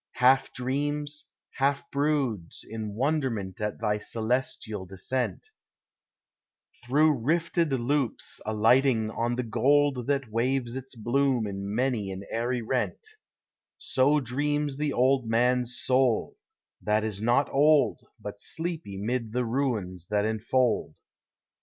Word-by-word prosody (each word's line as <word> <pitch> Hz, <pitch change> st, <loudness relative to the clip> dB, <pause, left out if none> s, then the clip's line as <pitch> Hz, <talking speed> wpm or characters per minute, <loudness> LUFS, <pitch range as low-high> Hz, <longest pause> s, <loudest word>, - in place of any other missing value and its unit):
33 125 Hz, +2 st, +4 dB
Half 135 Hz, 0 st, +4 dB
dreams, 145 Hz, +3 st, -2 dB, 0.3 s
half 140 Hz, +1 st, 0 dB
broods, 140 Hz, -, -1 dB
in 110 Hz, -2 st, -5 dB
wonderment 120 Hz, -, -1 dB
At 105 Hz, -1 st, -2 dB
thy 105 Hz, -1 st, 0 dB
celestial 110 Hz, -3 st, -2 dB
descent, 125 Hz, -, -3 dB, 1.3 s
Through 145 Hz, +3 st, +3 dB
rifted 165 Hz, +4 st, +1 dB
loops 130 Hz, 0 st, -1 dB
alighting 110 Hz, +1 st, +3 dB
on 120 Hz, +2 st, -1 dB
the 125 Hz, -, -1 dB
gold 135 Hz, +2 st, +2 dB
That 140 Hz, -5 st, 0 dB
waves 120 Hz, +1 st, 0 dB
its 130 Hz, 0 st, -7 dB
bloom 125 Hz, +1 st, +1 dB
in 100 Hz, 0 st, -4 dB
many 120 Hz, -5 st, 0 dB
an 95 Hz, +1 st, -6 dB
airy 120 Hz, +1 st, -1 dB
rent: 130 Hz, -, -2 dB, 0.7 s
So 140 Hz, +3 st, +2 dB
dreams 145 Hz, +3 st, -1 dB
the 150 Hz, 0 st, 0 dB
old 130 Hz, -1 st, +2 dB
man's 125 Hz, +2 st, +1 dB
soul, 130 Hz, -, +2 dB, 0.5 s
that 105 Hz, 0 st, +1 dB
is 105 Hz, -2 st, -3 dB
not 120 Hz, +5 st, +3 dB
old, 145 Hz, -2 st, +4 dB, 0.2 s
But 105 Hz, -1 st, -7 dB
sleepy 160 Hz, -, -4 dB
'mid 115 Hz, +2 st, -2 dB
the 125 Hz, 0 st, 0 dB
ruins 110 Hz, -9 st, -2 dB
that 105 Hz, 0 st, +1 dB
enfold. 110 Hz, -4 st, 0 dB
125 Hz, 120 wpm, -27 LUFS, 110-140 Hz, 1.3 s, 33